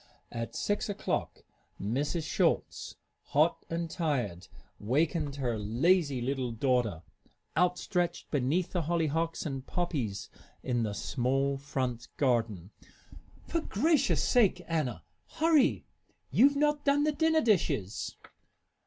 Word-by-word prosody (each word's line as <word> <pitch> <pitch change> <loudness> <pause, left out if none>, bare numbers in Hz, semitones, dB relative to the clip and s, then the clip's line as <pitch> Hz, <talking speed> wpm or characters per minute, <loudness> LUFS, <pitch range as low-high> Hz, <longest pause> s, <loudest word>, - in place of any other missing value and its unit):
At 115 -1 -5
six 205 +1 -1
o'clock 205 - -2 0.4
Mrs. 145 - -1
Schulz, - - 0 0.3
hot - - +1
and 165 0 -2
tired, 125 - -2 0.3
wakened 145 +5 0
her 120 -5 -1
lazy 135 - +2
little 130 -1 -1
daughter, 115 - 0 0.5
outstretched 175 0 0
beneath 150 +6 +1
the 180 - 0
hollyhocks 165 0 0
and 135 -3 -4
poppies 135 - -2 0.3
in 120 -2 0
the 105 -2 -1
small 135 +5 0
front 130 -3 -3
garden. 115 - 0 0.8
"For 335 - 0
gracious 290 +3 +2
sake, 205 -7 +3
Anna! 135 - -1 0.3
Hurry! 315 -3 +3 0.5
You've 280 +4 +5
not 295 0 +1
done 285 +1 +3
the 305 - +3
dinner 320 +1 +2
dishes!" 155 - 0
145 Hz, 110 wpm, -30 LUFS, 120-180 Hz, 0.8 s, You've